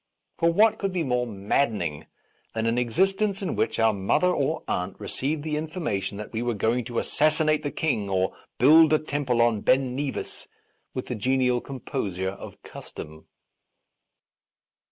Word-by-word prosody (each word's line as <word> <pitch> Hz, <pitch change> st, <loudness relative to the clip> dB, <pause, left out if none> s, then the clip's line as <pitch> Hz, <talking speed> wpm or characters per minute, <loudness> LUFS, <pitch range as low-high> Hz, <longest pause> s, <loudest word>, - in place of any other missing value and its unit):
For 170 Hz, 0 st, +4 dB
what 215 Hz, +5 st, +4 dB
could 195 Hz, -1 st, -1 dB
be 180 Hz, -2 st, -1 dB
more 125 Hz, -3 st, 0 dB
maddening 100 Hz, -, -1 dB, 0.5 s
than 110 Hz, 0 st, -1 dB
an 115 Hz, +1 st, +1 dB
ex 120 Hz, +2 st, -3 dB
istence 195 Hz, +2 st, +2 dB
in 185 Hz, -, -2 dB
which -, -, 0 dB
our 115 Hz, -1 st, +4 dB
mother 100 Hz, -, +2 dB
or 155 Hz, -1 st, -1 dB
aunt 90 Hz, +1 st, -2 dB
re 100 Hz, -, -8 dB
ceived 145 Hz, +3 st, -2 dB
the 155 Hz, -1 st, -2 dB
information 155 Hz, -, -3 dB
that 105 Hz, +2 st, -8 dB
we 110 Hz, -, -2 dB
were 120 Hz, -1 st, -1 dB
going 115 Hz, +4 st, 0 dB
to 120 Hz, -1 st, -5 dB
assassinate 155 Hz, +2 st, +2 dB
the 145 Hz, -, -2 dB
King 130 Hz, -11 st, -1 dB
or 95 Hz, 0 st, 0 dB, 0.2 s
build 155 Hz, +4 st, +7 dB
a -, -, +6 dB
temple 145 Hz, -6 st, 0 dB
on 115 Hz, -3 st, +1 dB
Ben 130 Hz, +1 st, +2 dB
Nevis 140 Hz, 0 st, -4 dB, 0.5 s
with 130 Hz, -, -3 dB
the -, -, -4 dB
genial 125 Hz, +2 st, +1 dB
composure 95 Hz, -8 st, -3 dB
of 100 Hz, -, -11 dB
custom 80 Hz, +1 st, -10 dB
125 Hz, 165 wpm, -26 LUFS, 110-155 Hz, 0.5 s, build